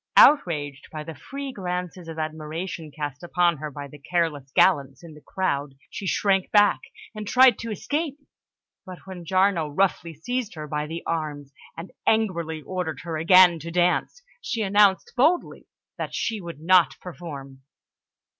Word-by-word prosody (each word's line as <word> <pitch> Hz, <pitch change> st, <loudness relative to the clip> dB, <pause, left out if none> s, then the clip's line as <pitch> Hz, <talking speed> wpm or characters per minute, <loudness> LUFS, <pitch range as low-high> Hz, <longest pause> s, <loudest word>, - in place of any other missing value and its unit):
Outraged 150 Hz, -, +4 dB
by 155 Hz, -1 st, -6 dB
the 165 Hz, +1 st, -8 dB
free 275 Hz, -, -7 dB
glances 180 Hz, -2 st, -5 dB
of 165 Hz, -1 st, -7 dB
admiration 160 Hz, +2 st, -5 dB
cast 145 Hz, -1 st, -6 dB
upon 175 Hz, -1 st, +1 dB
her 150 Hz, +2 st, -5 dB
by 145 Hz, 0 st, -8 dB
the 145 Hz, +1 st, -14 dB
careless 150 Hz, -3 st, -1 dB
gallants 140 Hz, -6 st, +3 dB
in 165 Hz, -2 st, -11 dB
the 150 Hz, -, -15 dB
crowd, 145 Hz, -7 st, -2 dB, 0.2 s
she 195 Hz, -, -5 dB
shrank 195 Hz, 0 st, +1 dB
back 205 Hz, -1 st, +4 dB, 0.3 s
and 215 Hz, -1 st, -7 dB
tried 255 Hz, -1 st, +6 dB
to 230 Hz, -, -5 dB
escape, 290 Hz, -, -3 dB, 0.7 s
and 185 Hz, -1 st, -8 dB
when 185 Hz, -3 st, -9 dB
Giarno 185 Hz, -2 st, +2 dB
roughly 170 Hz, +1 st, 0 dB
seized 230 Hz, -, -3 dB
her 155 Hz, -1 st, -6 dB
by 150 Hz, 0 st, -3 dB
the 165 Hz, +2 st, -6 dB
arms 145 Hz, -4 st, -4 dB, 0.2 s
and 165 Hz, +3 st, -8 dB, 0.2 s
angrily 170 Hz, -8 st, 0 dB
ordered 180 Hz, -6 st, -4 dB
her 165 Hz, -2 st, -5 dB
again 175 Hz, +1 st, +6 dB
to 165 Hz, +2 st, -7 dB
dance, 180 Hz, -, 0 dB, 0.2 s
she 230 Hz, -, -2 dB
announced 200 Hz, -1 st, +3 dB
boldly 320 Hz, +8 st, +1 dB, 0.3 s
that -, -, -4 dB
she 220 Hz, -3 st, -2 dB
would 170 Hz, -4 st, -8 dB
not 180 Hz, +1 st, +4 dB
perform. 140 Hz, -7 st, -9 dB
170 Hz, 155 wpm, -24 LUFS, 155-195 Hz, 0.7 s, tried